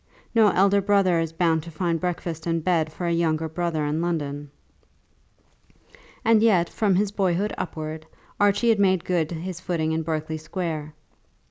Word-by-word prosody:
No 225 Hz, -2 st, +5 dB
elder 200 Hz, +1 st, +3 dB
brother 195 Hz, -3 st, +3 dB
is 165 Hz, -1 st, -2 dB
bound 165 Hz, -1 st, +1 dB
to 170 Hz, -, -10 dB
find 165 Hz, 0 st, -1 dB
breakfast 175 Hz, -2 st, -4 dB
and 165 Hz, -1 st, 0 dB
bed 165 Hz, -3 st, +1 dB
for 175 Hz, -, -5 dB
a 170 Hz, -, +1 dB
younger 160 Hz, -1 st, 0 dB
brother 160 Hz, -1 st, -2 dB
in 150 Hz, +2 st, -1 dB
London. 145 Hz, -4 st, -3 dB, 1.8 s
And 225 Hz, -1 st, +5 dB
yet 185 Hz, -7 st, +3 dB
from 205 Hz, -4 st, +1 dB
his 200 Hz, +1 st, +1 dB
boyhood 195 Hz, 0 st, 0 dB
upwards 155 Hz, -2 st, -5 dB, 0.3 s
Archie 205 Hz, +3 st, +3 dB
had 220 Hz, -2 st, +3 dB
made 190 Hz, -3 st, +2 dB
good 170 Hz, -4 st, 0 dB
his 175 Hz, +1 st, -5 dB
footing 165 Hz, -4 st, -1 dB
in 160 Hz, 0 st, 0 dB
Berkeley 155 Hz, 0 st, -3 dB
Square. 155 Hz, -3 st, -4 dB
170 Hz, 160 wpm, -24 LUFS, 160-190 Hz, 1.8 s, No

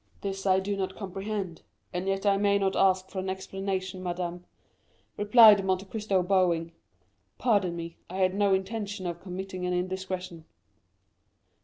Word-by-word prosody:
"This 195 Hz, 0 st, -3 dB
I 190 Hz, 0 st, +5 dB
do 200 Hz, +1 st, -2 dB
not 190 Hz, -1 st, -3 dB
comprehend; 195 Hz, -2 st, -5 dB, 0.3 s
and 180 Hz, +2 st, -3 dB
yet 195 Hz, +1 st, -1 dB
I 200 Hz, -1 st, +4 dB
may 200 Hz, 0 st, +3 dB
not 195 Hz, -1 st, 0 dB
ask 190 Hz, -1 st, +2 dB
for 190 Hz, -, -4 dB
an 185 Hz, 0 st, -3 dB
explanation, 190 Hz, 0 st, -4 dB
madame," 175 Hz, 0 st, -4 dB, 0.7 s
replied 210 Hz, -1 st, +7 dB
Monte 190 Hz, 0 st, 0 dB
Cristo 200 Hz, -3 st, 0 dB
bowing. 175 Hz, -3 st, +2 dB, 0.7 s
"Pardon 200 Hz, -8 st, +2 dB
me, 170 Hz, 0 st, -7 dB
I 180 Hz, -, -7 dB
had 185 Hz, -1 st, +2 dB
no 200 Hz, 0 st, +2 dB
intention 200 Hz, 0 st, -4 dB
of 170 Hz, -1 st, -4 dB
committing 185 Hz, 0 st, -6 dB
an 180 Hz, -, 0 dB
indiscretion." 185 Hz, -2 st, -4 dB
190 Hz, 150 wpm, -28 LUFS, 180-200 Hz, 0.7 s, replied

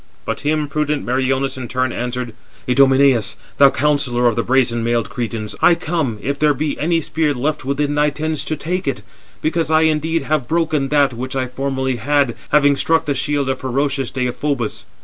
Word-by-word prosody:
But -, -, -3 dB
him 150 Hz, 0 st, 0 dB
prudent 150 Hz, 0 st, -1 dB
Meriones 130 Hz, +2 st, 0 dB
in 125 Hz, -2 st, -5 dB
turn 130 Hz, +1 st, -1 dB
answered: 125 Hz, -1 st, -4 dB, 0.3 s
"Idomeneus, 135 Hz, -4 st, +4 dB, 0.2 s
thou 140 Hz, -1 st, +8 dB
counsellor 135 Hz, -3 st, +1 dB
of 120 Hz, -2 st, +3 dB
the 115 Hz, -, +1 dB
brazen 120 Hz, -2 st, +1 dB
mailed 120 Hz, 0 st, 0 dB
Cretans, 110 Hz, -3 st, -4 dB
I 175 Hz, -, +6 dB
come, 160 Hz, -9 st, -2 dB
if 140 Hz, +1 st, -2 dB
there 150 Hz, -1 st, +3 dB
be 150 Hz, +2 st, -2 dB
any 165 Hz, +1 st, +1 dB
spear 155 Hz, -1 st, 0 dB
left 140 Hz, +2 st, -2 dB
within 145 Hz, +2 st, 0 dB
thy 150 Hz, 0 st, +2 dB
tents, 155 Hz, +1 st, -3 dB
to 155 Hz, -, -2 dB
take 175 Hz, +3 st, -3 dB
it: 135 Hz, -, -2 dB, 0.4 s
because 165 Hz, 0 st, 0 dB
I 160 Hz, 0 st, +4 dB
indeed 160 Hz, 0 st, +1 dB
have 145 Hz, -3 st, -1 dB
broken 155 Hz, -3 st, 0 dB
that 145 Hz, -3 st, +3 dB
which 130 Hz, +3 st, -5 dB
I 130 Hz, -1 st, 0 dB
formerly 130 Hz, 0 st, -2 dB
had, 140 Hz, +1 st, +1 dB
having 145 Hz, -1 st, +4 dB
struck 165 Hz, +3 st, +2 dB
the 145 Hz, -, 0 dB
shield 140 Hz, 0 st, -1 dB
of 130 Hz, -1 st, -1 dB
ferocious 135 Hz, 0 st, -1 dB
Deïphobus." 125 Hz, -1 st, -2 dB
140 Hz, 185 wpm, -19 LUFS, 125-150 Hz, 0.4 s, thou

